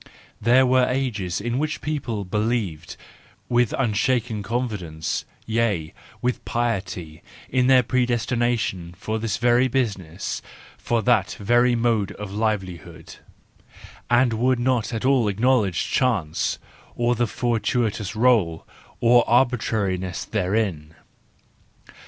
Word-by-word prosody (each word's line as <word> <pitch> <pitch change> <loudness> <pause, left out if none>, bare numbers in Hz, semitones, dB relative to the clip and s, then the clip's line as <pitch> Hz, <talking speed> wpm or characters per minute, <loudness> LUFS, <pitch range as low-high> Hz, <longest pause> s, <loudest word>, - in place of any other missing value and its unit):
There 125 +4 +5
were 130 0 +3
ages 110 -9 -2
in 120 +4 -2
which 155 0 -2
people 125 -9 -3
believed 105 -5 -2 0.5
with 120 -2 +2
unshaken 120 -1 0
confidence, 100 -8 -3 0.2
yea, 110 -8 0 0.3
with 125 0 -1
piety, 95 -9 -3 0.3
in 125 0 +2
their 130 -1 +6
predestination 120 -7 0
for 110 +3 -3
this 110 0 -2
very 120 +1 +3
business, 100 -10 -2 0.3
for 115 -2 -1
that 125 -1 +2
very 120 +4 +3
mode 115 -4 +1
of 105 -2 -7
livelihood, 95 -7 -4 0.9
and 120 0 +3
would 125 +3 +2
not 120 -2 0
at 115 +1 -3
all 130 -4 +3
acknowledge 105 -3 +1
chance, 95 - 0 0.4
or 120 0 +1
the 120 0 0
fortuitous 115 -3 -1
r6Ie, 110 -8 +2 0.4
or 120 0 +6
arbitrariness 110 -7 +1
therein. 95 -6 -1
115 Hz, 110 wpm, -23 LUFS, 100-125 Hz, 0.9 s, their